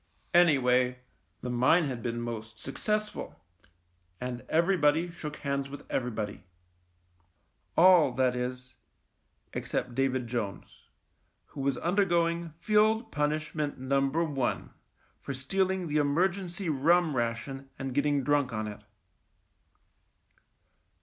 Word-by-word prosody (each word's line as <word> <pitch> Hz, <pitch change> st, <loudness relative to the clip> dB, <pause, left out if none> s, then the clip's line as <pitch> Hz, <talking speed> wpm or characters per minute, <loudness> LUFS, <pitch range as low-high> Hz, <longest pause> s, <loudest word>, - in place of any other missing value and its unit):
Anyway, 125 Hz, -7 st, +4 dB, 0.4 s
the 125 Hz, -, -4 dB
mine 130 Hz, +8 st, +4 dB
had 130 Hz, -5 st, -3 dB
been 120 Hz, 0 st, -2 dB
most 110 Hz, -2 st, -6 dB
successful 210 Hz, -, -3 dB, 0.4 s
— 90 Hz, 0 st, -42 dB
and 120 Hz, 0 st, -6 dB
everybody 165 Hz, -1 st, +3 dB
shook 150 Hz, -3 st, -6 dB
hands 140 Hz, -1 st, -2 dB
with 145 Hz, -, -9 dB
every 125 Hz, -1 st, 0 dB
body. 105 Hz, -4 st, -5 dB, 1.3 s
All, 175 Hz, -5 st, +7 dB
that 125 Hz, 0 st, +2 dB
is, 125 Hz, +1 st, -4 dB, 0.8 s
except 125 Hz, -, -3 dB
David 130 Hz, 0 st, 0 dB
Jones, 110 Hz, -7 st, -5 dB, 0.6 s
who 140 Hz, -, -7 dB
was 135 Hz, 0 st, +1 dB
THE -, -, -8 dB
MINE 170 Hz, -, 0 dB
105 185 Hz, -2 st, +3 dB
undergoing 170 Hz, -1 st, -1 dB
Field 215 Hz, +4 st, +2 dB
Punishment 150 Hz, 0 st, -1 dB
Number 135 Hz, +4 st, +1 dB
One 140 Hz, -6 st, -2 dB, 0.5 s
for 140 Hz, -, -5 dB
stealing 190 Hz, +7 st, 0 dB
the 155 Hz, -2 st, -1 dB
emergency 175 Hz, +5 st, 0 dB
rum 160 Hz, +2 st, +3 dB
ration 125 Hz, +3 st, -3 dB
and 135 Hz, -1 st, -4 dB
getting 145 Hz, 0 st, +1 dB
drunk 145 Hz, -1 st, +2 dB
on 110 Hz, -1 st, -3 dB
it. 105 Hz, 0 st, -8 dB
140 Hz, 120 wpm, -29 LUFS, 125-170 Hz, 1.3 s, All